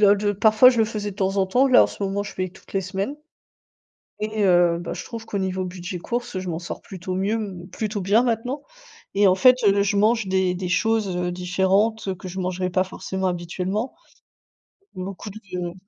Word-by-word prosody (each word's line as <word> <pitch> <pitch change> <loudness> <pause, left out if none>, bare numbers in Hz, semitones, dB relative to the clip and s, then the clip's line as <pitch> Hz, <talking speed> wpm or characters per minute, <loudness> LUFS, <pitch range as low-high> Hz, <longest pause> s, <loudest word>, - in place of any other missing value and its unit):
d 205 +1 -2
j - - +1
parfois, 220 +4 +6
je 240 - -1
le 220 - +5
faisais 210 -2 -4
de - - -13
temps 195 -1 0
en 195 - +3
temps, 250 +8 +3
là, 255 -1 +7
en - - +1
ce - - -11
moment, 200 +1 -1
je 205 - -8
fais 185 0 -2
toutes - - -18
les 195 - +1
semaines 195 +8 -3 1.1
et 215 0 -1
heu 175 -2 +4
bah, 175 - -5
je - - -6
trouve 230 -1 -7
qu'au 205 - -3
niveau 190 -1 -1
budget 180 0 -6
courses, 240 +6 -4
heu, - - -1
je 185 - -6
m'en 160 - -3
sors 170 - -7
plutôt 185 -1 -6
mieux 200 +4 0 0.3
plutôt 210 0 -3
bien 205 +5 +4
maintenant. 245 +4 -1 0.5
Et 200 +1 +4
en 185 - +5
fait, 250 +6 +7
heu, 200 0 +4
je 200 +1 0
mange 220 +1 +3
des 190 -1 +1
des 180 0 -4
choses, 215 -1 +1
heu, 180 0 -1
différentes 190 +4 +1
que 190 - -8
je 185 +2 -7
mangerais 185 0 -1
pas 185 +1 +2
forcément 190 0 -3
habituellement. 180 +6 -3 1.0
Beaucoup 190 +2 -6
de 180 -4 -6
195 Hz, 210 wpm, -23 LUFS, 185-215 Hz, 1.1 s, là